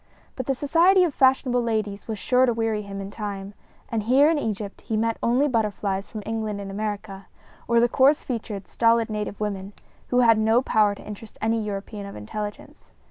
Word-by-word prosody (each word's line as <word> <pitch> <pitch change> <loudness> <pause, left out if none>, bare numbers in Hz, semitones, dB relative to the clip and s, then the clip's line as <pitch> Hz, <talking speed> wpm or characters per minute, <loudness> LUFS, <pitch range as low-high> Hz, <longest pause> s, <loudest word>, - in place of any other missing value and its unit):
But 255 - -5
the 270 - +1
society 340 +8 +4
of 335 -5 0
fashionable 260 -2 +3
ladies 215 -3 -2
was 220 -2 -3
sure 255 +6 +3
to 240 - +2
weary 225 -2 0
him 200 -1 -7
in 195 0 -7
time, 200 -2 -6 0.3
and 225 -1 -1
here 265 +8 +4
in 315 - +1
Egypt 210 -5 -4
he 220 - -2
met 225 +1 0
only 255 +5 +2
butterflies 205 -5 -1
from 215 -2 -7
England 220 -2 -3
and 195 -1 -6
America, 200 -1 -5 0.4
or 235 0 +4
the 240 - +4
coarse 270 +5 +3
featured, 215 -5 -5
stolid 230 -1 +2
native 210 -1 -4
women, 200 -1 -4 0.3
who 250 0 +3
had 230 -2 +5
no 220 +2 +4
power 210 -4 +3
to - - -13
interest 210 +1 -10
any 225 +1 0
European 205 0 -5
of - - -9
intelligence. 205 - -7
220 Hz, 190 wpm, -24 LUFS, 205-240 Hz, 0.4 s, had